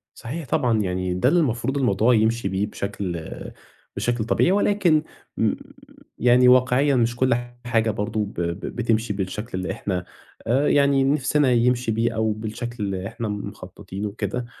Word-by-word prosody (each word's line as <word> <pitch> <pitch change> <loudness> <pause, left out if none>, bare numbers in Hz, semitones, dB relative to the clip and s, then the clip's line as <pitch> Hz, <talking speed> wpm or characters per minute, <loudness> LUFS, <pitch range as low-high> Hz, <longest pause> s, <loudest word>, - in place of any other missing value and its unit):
صحيح، 150 +7 -6
طبعًا 115 -2 +1
يعني 90 -1 -1
ده 90 +8 +2
اللي 175 +4 +3
المفروض 130 -2 0
الموضوع 120 -2 +3
يمشِي 110 0 +1
بيه 95 +2 -1
بشكل، 95 -5 -5 0.7
بشكل 120 -2 -1
طبيعي 145 +10 +2
ولكن 195 -6 +3 1.2
يعني 125 +1 +5
واقعيًا 130 +3 +4
مش 120 -1 +1
كُلّ 130 0 +2 0.3
حاجة 115 -2 +1
برضه 105 +1 -3
ب 100 - -10
ب 85 +1 -2 0.2
بتمشِي 115 -2 0
بالشكل 100 +2 -4
اللي 95 0 -3
إحنا 95 -3 -3 0.4
آآ، 130 +5 +2
يعني 140 -1 +4
نِفسنا 140 0 +2
يمشِي 125 0 +2
بيه 115 +1 0
أو 110 0 +1
بالشكل 110 +2 -5
اللي 95 -1 -3
إحنا 115 - -5
مخططينه 100 -1 -6
وكده، 105 +3 -4
115 Hz, 150 wpm, -23 LUFS, 100-125 Hz, 1.2 s, يعني